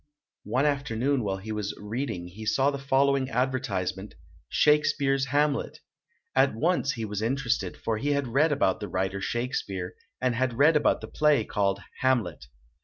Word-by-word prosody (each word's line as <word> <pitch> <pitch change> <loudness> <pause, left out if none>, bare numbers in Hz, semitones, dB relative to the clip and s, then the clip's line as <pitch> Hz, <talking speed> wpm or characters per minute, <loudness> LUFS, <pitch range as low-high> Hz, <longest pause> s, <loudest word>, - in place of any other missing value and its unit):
One 130 +3 +1
afternoon 140 -2 0
while 95 -2 -1
he 105 +3 -7
was 105 -1 -3
reading, 105 -4 -4
he 100 +5 -10
saw 135 +6 +2
the 140 - -5
following 135 0 +2
advertisement, 110 -7 -2 0.3
"Shakespeare's 140 -2 +3
Ham 145 +2 +2
let"! - - -5 0.6
At 135 -2 +3
once 155 +1 +1
he 115 -2 -4
was 105 -1 -4
interested, 115 -6 -1
for 110 -2 -2
he 145 +3 0
had 140 -2 -1
read 150 +6 +3
about 110 -9 +1
the 105 - -5
writer 95 +2 -2
Shakespeare 100 -6 -3 0.3
and 130 -1 +1
had 125 -1 -1
read 150 +4 +6
the 150 -1 +1
play 150 -6 +2
called 100 -1 0 0.2
"Hamlet". 125 - 0
125 Hz, 160 wpm, -27 LUFS, 105-140 Hz, 0.6 s, read